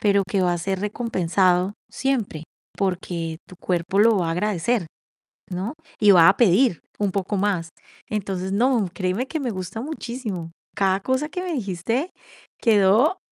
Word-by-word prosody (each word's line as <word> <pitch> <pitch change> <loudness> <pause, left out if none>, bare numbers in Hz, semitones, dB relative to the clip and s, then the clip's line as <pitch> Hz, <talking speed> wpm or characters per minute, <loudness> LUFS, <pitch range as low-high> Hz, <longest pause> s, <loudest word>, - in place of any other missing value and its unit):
pero 200 -1 +3
que 195 -2 +1
va 180 - +2
a 175 - -1
ser 190 +2 -2
recompensado 190 -4 +1 0.2
siempre, 230 - -2 0.3
porque 175 -4 -2
tu 185 - -13
cuerpo 180 +2 -1
lo 220 -1 +5
va 170 -2 0
a - - 0
agradecer, 205 +2 0 0.7
¿no? 190 +8 -3 0.3
Y 210 - +5
va 170 -4 +8
a 195 - +4
pedir 225 -2 +4 0.2
un 205 -2 +1
poco 195 +1 -2
más. 190 -4 0 0.4
Entonces, 190 -3 -3
no, 235 -2 +2
créeme 190 +7 -1
que 315 - -3
me 255 -5 -2
gusta 185 +3 -5
muchísimo. 240 - -5 0.3
Cada 190 -1 +2
cosa 260 +6 -1
que 360 +2 -4
me 355 -2 -3
dijiste 225 - -2 0.5
quedó 225 - +4
200 Hz, 160 wpm, -23 LUFS, 180-235 Hz, 0.7 s, va